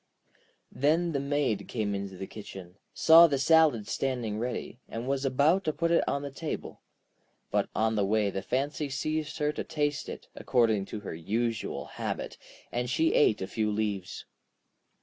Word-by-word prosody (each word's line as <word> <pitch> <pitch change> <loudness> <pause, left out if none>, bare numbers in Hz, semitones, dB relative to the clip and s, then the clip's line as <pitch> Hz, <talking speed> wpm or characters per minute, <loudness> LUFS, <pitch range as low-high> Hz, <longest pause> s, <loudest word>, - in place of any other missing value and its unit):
Then 165 +5 +2
the 140 - -1
Maid 140 -7 -1
came 105 -3 -2
into 100 -1 -5
the 95 - -5
kitchen, 95 -3 -10
saw 165 +1 +8
the 140 -3 0
salad 145 -6 +4
standing 120 -6 -2
ready, 120 0 -4
and 115 +2 -5
was 135 0 0
about 145 +8 +3
to 155 - 0
put 170 +3 0
it 170 - +4
on 140 0 -1
the 140 - -5
table. 155 +3 -6 0.7
But - - +1
on 110 0 +2
the 105 -2 +1
way 105 0 +1
the 95 - -3
fancy 140 +5 -2
seized 155 +3 -2
her 150 -1 +1
to - - -4
taste 145 -1 -2
it, - - -8
according 110 -5 +2
to 105 - -7
her 100 - -6
usual 110 +7 -2
habit, - - -5 0.3
and 120 0 -2
she 160 +6 +2
ate 110 -9 +3
a - - -4
few 110 +1 -1
leaves. 105 -3 -3
125 Hz, 170 wpm, -29 LUFS, 105-150 Hz, 0.7 s, saw